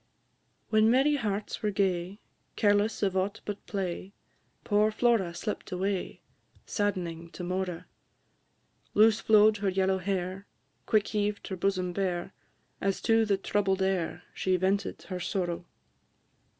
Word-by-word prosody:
I. - - -44
When 215 0 +5
merry 270 +5 +4
hearts 210 -4 -3
were 210 - +1
gay, 190 0 -1 0.3
Careless 205 +1 +2
of 190 -2 +1
aught 200 +3 -1
but 205 -1 -5
play, 190 -1 -4 0.5
Poor 210 0 +3
Flora 220 -5 +2
slipt 210 +3 -4
away, 190 +1 -2 0.4
Sadd'ning 175 -5 -2
to 180 - -6
Mora; 180 -1 -3 1.1
Loose 215 +1 +6
flow'd 215 0 +5
her 200 -1 0
yellow 190 0 +1
hair, 190 +1 -3 0.4
Quick 215 -2 +2
heaved 210 -1 -1
her 190 - -3
bosom 185 -1 0
bare, 180 -2 -2 0.5
As 195 0 0
to 225 0 +4
the 200 -2 +2
troubled 195 -1 0
air 190 -3 -1
She 185 -1 +1
vented 190 +2 0
her 185 -1 -5
sorrow. 180 -1 -2
195 Hz, 135 wpm, -29 LUFS, 185-210 Hz, 1.1 s, Loose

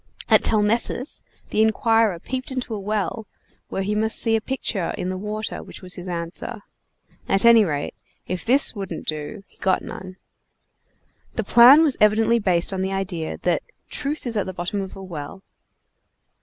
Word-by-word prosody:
At - - +6
Telmessus 225 +5 +1 0.3
the 215 - +2
inquirer 220 -2 +3
peeped 255 +9 -5
into 255 -3 -4
a 210 - -3
well, 210 +1 -3 0.4
where 195 - -2
he 205 +2 -1
must 220 +1 +1
see 225 -1 +2
a 220 - 0
picture 220 -7 -3
in 180 - -3
the 185 - -3
water 215 +2 -4
which - - -12
was 180 0 -2
his 180 +1 -5
answer; 180 +6 -6 0.7
at 195 +3 +3
any 230 -2 +8
rate, 145 -6 -2 0.3
if 180 -1 -4
this 260 +5 +4
wouldn't 195 -6 -6
do 155 +7 -4
he - - -24
got 190 -1 +1
none. 185 0 -9 1.2
This 225 -3 -4
plan 255 +7 +9
was 295 -5 +3
evidently 220 +2 +4
based 185 -3 +1
on 190 - -2
the 190 0 -1
idea 185 -4 -3
that - - +1 0.3
"truth 295 0 -3
is 235 -2 -2
at 205 - -1
the 190 - -5
bottom 180 +3 -3
of 190 - -7
a 195 - -9
well." 175 +1 -8
210 Hz, 175 wpm, -23 LUFS, 185-225 Hz, 1.2 s, plan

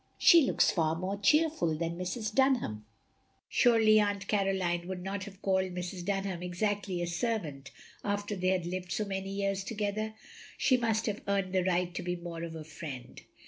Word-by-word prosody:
She 335 - +8
looks - - +3
far 160 -2 +1
more 185 +4 -2
cheerful 300 - +3
than 165 +1 -2
Mrs. 210 +5 -3
Dunham. 240 - +1 0.6
Surely 225 -3 +5
Aunt 205 -1 0
Caroline 190 -4 0
would 185 -1 -5
not 195 0 -3
have 200 -1 -12
called 190 -1 +2
Mrs. 180 0 -4
Dunham 195 -2 -2
exactly 185 0 -1
a - - 0
servant 170 - -2 0.3
after 205 0 -2
they 185 -1 -1
had 185 -2 +1
lived 180 0 -4
so 215 - 0
many 195 -1 -4
years 195 0 -1
together? 215 +1 -2 0.4
She 260 - +4
must 225 -2 +1
have 210 -1 -2
earned 195 -2 0
the 185 -1 +2
right 180 -1 +1
to 180 - -3
be 180 0 -2
more 170 -1 -7
of 165 -1 -5
a 160 - -6
friend. 150 -5 -8
190 Hz, 180 wpm, -31 LUFS, 175-205 Hz, 0.6 s, She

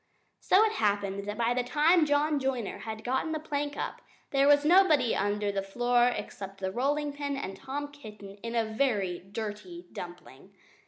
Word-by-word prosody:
So 385 +3 +5
it 440 - +2
happened 200 - 0
that 210 +1 -4
by 235 +1 +2
the 250 0 0
time 305 +6 +4
John 290 +1 +2
Joiner 260 -6 -2
had 220 -1 -6
got 260 +5 -1
the 315 - -2
plank 290 -1 -3
up - - -4 0.3
there 275 0 +3
was 290 0 +5
nobody 315 -7 +5
here - - 0
under 205 +1 0
the 200 -1 -1
floor 240 +5 +2
except 195 -5 -5
the 190 -1 -2
rolling 285 +6 0
pin 285 -1 -3
and 195 -8 -5
Tom 285 +5 -5
Kitten 210 -8 -11
in 230 +3 -6
a 230 -1 +2
very 220 -6 0
dirty 195 -3 -7
dumpling! 175 0 -10
240 Hz, 180 wpm, -29 LUFS, 200-290 Hz, 0.3 s, So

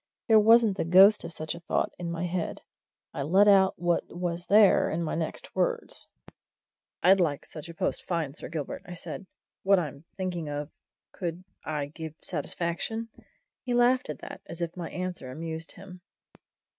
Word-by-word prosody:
There 220 -2 +7
wasn't 220 -2 +5
the - - 0
ghost 190 +5 +7
of - - -6
such 155 -1 -4
a 170 - -8
thought 170 - -1
in 175 -1 -3
my 170 +1 -2
head 175 -1 -3 0.5
I - - -3
let 190 +9 +4
out 195 -2 +5
what 175 0 +1
was 175 0 -4
there 205 -1 +6
in 170 +2 -1
my 160 - -2
next 160 -1 -4
words. - - -1 1.0
"I'd 190 +2 +6
like 150 -6 0
such 160 +1 -9
a 170 - -9
post - - -1
fine, 165 -6 -1
Sir - - -8
Gilbert," 155 -4 -4
I 175 - -7
said. 185 +3 -8 0.3
"What 195 0 +4
I'm 150 -3 -4
thinking 175 -5 -3
of 145 +1 -4 0.4
could 175 -1 -5 0.2
I 150 -2 -2
give 155 +1 -8
satisfaction?" 180 +7 -3 0.5
He 245 -1 -2
laughed 245 -1 +3
at 150 - -4
that, - - -8
as 170 - -7
if 170 -1 -3
my 175 -2 -5
answer 180 -7 -5
amused 160 +4 -6
him. 185 -2 -12
175 Hz, 175 wpm, -28 LUFS, 160-190 Hz, 1.0 s, There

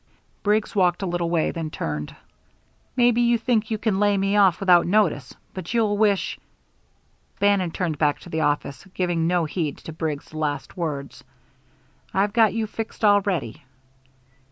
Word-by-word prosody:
Briggs 210 +1 0
walked 180 -1 +2
a - - 0
little 175 -1 -1
way, 165 -2 +1
then 165 -2 -4
turned. 75 - -5 0.8
"Maybe 240 -1 +3
you 235 0 +3
think 225 -2 0
you 220 - -1
can 210 -3 0
lay 205 -1 +3
me 195 +1 +1
off 195 -4 +4
without 180 -3 +4
notice 180 - +1 0.2
but 185 +4 -6
you'll 215 -3 +2
wish 205 -2 +1 0.5
" - - -40
Bannon 200 -3 +2
turned 165 -3 -3
back 150 -2 +2
to - - -12
the 160 - -1
office, 145 -2 -1
giving 175 -3 0
no 175 -1 +1
heed 155 -2 -3
to 160 - -9
Briggs' 155 -2 -4
last 150 -2 -3
words: 150 -6 -5 0.9
"I've 200 +1 +1
got 225 -3 +4
you 225 -1 0
fixed 220 +1 -4
already." 200 - +1
185 Hz, 160 wpm, -23 LUFS, 160-210 Hz, 0.9 s, off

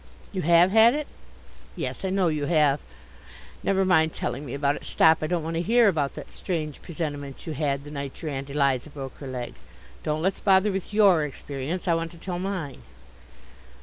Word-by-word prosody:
You 190 - -2
have 170 +3 +5
had 225 +4 +6
it? 300 0 -2 0.7
Yes, - - -4
I 190 - 0
know 190 -1 +2
you 155 -3 0
have. 150 -3 +3 0.8
Never 195 -1 +1
mind 160 -4 +3
telling 135 +4 -3
me 125 - -5
about 140 0 +1
it. - - -9
Stop. 160 0 +4
I 155 - -1
don't 170 -1 -1
want 165 +1 -3
to - - +1
hear 230 +5 +4
about 150 -7 0
that - - -9
strange 155 -6 -4
presentiment 145 -5 -5
you 160 - -4
had 140 -2 -1
the 145 - -10
night 140 -2 -6
your 155 -3 -4
Aunt 135 0 -5
Eliza 140 -1 +1
broke 135 -3 -8
her 140 - -8
leg. 125 -2 -5 0.5
Don't 155 +1 -2
let's 190 +1 0
bother 195 +1 +4
with 190 +1 -4
your 200 -6 +5
experience. 145 +5 -5
I 170 - +4
want 165 0 -1
to - - -13
tell 175 +1 -4
mine. 185 -7 -4
160 Hz, 200 wpm, -26 LUFS, 145-185 Hz, 0.8 s, had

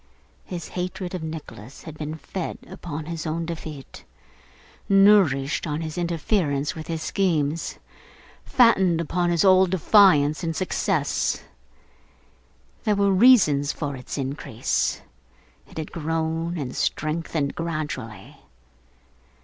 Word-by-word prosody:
His 175 -3 -6
hatred 180 0 -4
of 180 - -4
Nicholas 155 -7 -8
had 160 -2 -9
been 155 0 -5
fed 175 +2 -5
upon 155 -2 -7
his 165 0 -5
own 165 +2 -2
defeat, 155 -5 -8 0.9
nourished 195 -9 +4
on 150 +1 -2
his 155 -1 -5
interference 170 -4 0
with 160 -1 -8
his 160 -1 -3
schemes, 165 -5 0 0.7
fattened 190 -9 +4
upon 175 +2 0
his 170 +2 +2
old 185 -1 +6
defiance 180 -4 +4
and 165 -1 -2
success. 185 -4 -1 1.4
There 210 - +2
were 200 0 +2
reasons 185 - +5
for 145 -3 -4
its 125 +2 -7
increase; 135 -4 -2 0.7
it - - -14
had 155 -1 -5
grown 165 +1 -2
and 130 -5 -5
strengthened 155 -1 -1
gradually. 150 - -5
160 Hz, 115 wpm, -24 LUFS, 150-180 Hz, 1.4 s, old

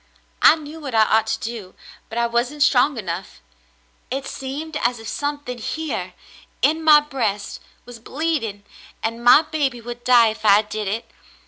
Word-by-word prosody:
I - - +8
knew 310 0 -10
what 275 -6 -6
I 220 - +6
ought 220 +1 +2
to - - -1
do, 220 -5 -7 0.3
but 225 - -7
I 235 - +2
wasn't 240 +5 0
strong 275 0 +3
enough. 175 - -6 0.7
It 270 +2 -3
seemed 285 +4 -6
as 240 -1 0
if 225 -1 -10
something 290 -3 -4
here 220 - -4 0.5
in 315 +4 +2
my 305 -1 +7
breast 225 -9 -3 0.3
was 245 -1 -11
bleeding, 250 -7 -3 0.4
and 230 +1 -3
my 250 +6 +7
baby 290 -6 -2
would 240 +1 -8
die 240 -3 +5
if 220 0 -8
I 210 0 +5
did 210 0 -5
it. 220 +4 -3
240 Hz, 165 wpm, -21 LUFS, 220-290 Hz, 0.7 s, I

